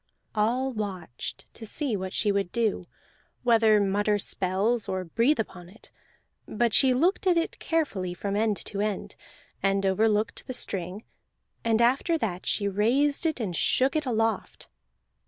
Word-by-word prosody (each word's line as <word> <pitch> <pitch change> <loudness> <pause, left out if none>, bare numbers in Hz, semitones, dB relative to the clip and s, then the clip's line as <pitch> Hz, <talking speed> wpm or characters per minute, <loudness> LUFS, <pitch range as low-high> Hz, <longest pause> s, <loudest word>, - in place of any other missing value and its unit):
All 240 +5 +1
watched 185 - -5
to - - -11
see 250 +2 -2
what 190 -1 -4
she 210 +1 +1
would 200 -3 -1
do, 220 -6 -1 0.6
whether 225 -3 +5
mutter 205 +1 +1
spells 200 +4 0
or 185 -1 -2
breathe 230 - +1
upon 180 -5 -5
it. 215 +5 -17 0.6
But 235 +1 0
she 265 - +6
looked 345 +10 +1
at 355 -2 +4
it 335 - -1
carefully 215 - -1
from 200 +2 -3
end 215 -1 +1
to 200 -1 -3
end, 210 -2 -3 0.5
and 195 0 +1
overlooked 210 +2 +1
the 255 - -3
string, 190 -2 -3 0.6
and 230 0 +3
after 275 +8 +2
that 185 - -3
she 200 - +1
raised 265 - +2
it 315 -4 -1
and 195 -7 -3
shook 260 - +2
it 305 -3 0
aloft. 225 -2 -1
215 Hz, 155 wpm, -27 LUFS, 195-245 Hz, 0.6 s, she